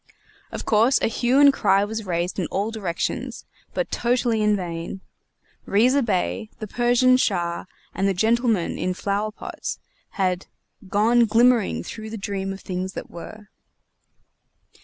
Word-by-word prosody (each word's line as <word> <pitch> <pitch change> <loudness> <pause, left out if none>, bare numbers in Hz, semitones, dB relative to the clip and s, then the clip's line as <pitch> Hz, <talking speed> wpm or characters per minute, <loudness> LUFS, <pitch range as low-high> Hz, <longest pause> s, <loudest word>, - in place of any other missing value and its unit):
Of - - -6
course, 230 +5 +4
a - - +1
hue 245 +4 +2
and 285 -1 +7
cry 200 -5 +3
was 220 -1 -5
raised 175 +2 -1
in 175 - -1
all 205 +3 -2
directions, 195 -7 -3 0.3
but - - -1
totally 235 -2 +1
in 210 0 +3
vain. 175 0 -5 0.7
Riza 250 +7 +4
Bey, 215 0 -1
the 215 - -5
Persian 245 +3 +3
Shah, 175 -8 0 0.3
and 195 - 0
the 195 - +2
gentlemen 225 -1 +1
in 185 0 -1
flower 200 +3 -1
pots, - - -6 0.4
had 185 -2 0 0.4
"gone 225 +5 +4
glimmering 225 - +3
through 220 - -7
the 225 - -6
dream 195 -1 -3
of 195 - -7
things 185 +1 -4
that - - -7
were." 210 +5 -10
210 Hz, 145 wpm, -23 LUFS, 190-235 Hz, 0.7 s, and